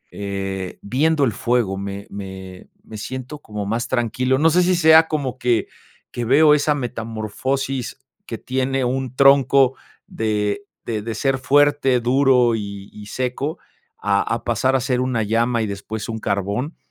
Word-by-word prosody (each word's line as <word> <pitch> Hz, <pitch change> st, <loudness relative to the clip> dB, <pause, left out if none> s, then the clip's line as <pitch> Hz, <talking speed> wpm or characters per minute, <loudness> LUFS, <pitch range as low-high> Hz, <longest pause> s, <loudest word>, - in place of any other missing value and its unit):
eh, 95 Hz, -2 st, -4 dB
viendo 145 Hz, +7 st, +1 dB
el 120 Hz, -, +1 dB
fuego 115 Hz, -4 st, 0 dB
me 100 Hz, +1 st, -6 dB
me 95 Hz, -2 st, -9 dB
me 110 Hz, -, -10 dB
siento 130 Hz, +6 st, -6 dB
como 105 Hz, -6 st, -6 dB
más 115 Hz, +4 st, -2 dB
tranquilo. 130 Hz, +1 st, 0 dB
No 160 Hz, +4 st, +4 dB
sé, 180 Hz, +3 st, +4 dB
si 180 Hz, +1 st, +2 dB
sea 160 Hz, -1 st, +6 dB
como 140 Hz, -5 st, -3 dB
que 120 Hz, -2 st, +1 dB, 0.4 s
que 120 Hz, -, -4 dB
veo, 150 Hz, +5 st, +5 dB
esa 150 Hz, 0 st, +2 dB
metamorfosis 125 Hz, +2 st, -3 dB, 0.3 s
que -, -, -5 dB
tiene 130 Hz, +1 st, -1 dB
un 130 Hz, 0 st, -2 dB
tronco, 135 Hz, -1 st, +5 dB, 0.3 s
de 105 Hz, -, -2 dB, 0.2 s
de 110 Hz, -2 st, -2 dB
de 115 Hz, +1 st, -5 dB
ser 135 Hz, +4 st, 0 dB
fuerte, 140 Hz, -1 st, +3 dB
duro, 125 Hz, -1 st, +3 dB
y 100 Hz, -2 st, -6 dB
y 105 Hz, -1 st, -11 dB
seco, 130 Hz, +6 st, -3 dB, 0.4 s
a 100 Hz, -1 st, +1 dB
a 115 Hz, -, -2 dB
pasar 130 Hz, +3 st, +1 dB
a -, -, +3 dB
ser 125 Hz, 0 st, 0 dB
una 125 Hz, -3 st, 0 dB
llama, 115 Hz, +2 st, +1 dB
y -, -, -2 dB
después 105 Hz, +2 st, -5 dB
un 110 Hz, 0 st, -4 dB
carbón. 100 Hz, -, -2 dB
125 Hz, 160 wpm, -21 LUFS, 105-135 Hz, 0.4 s, sea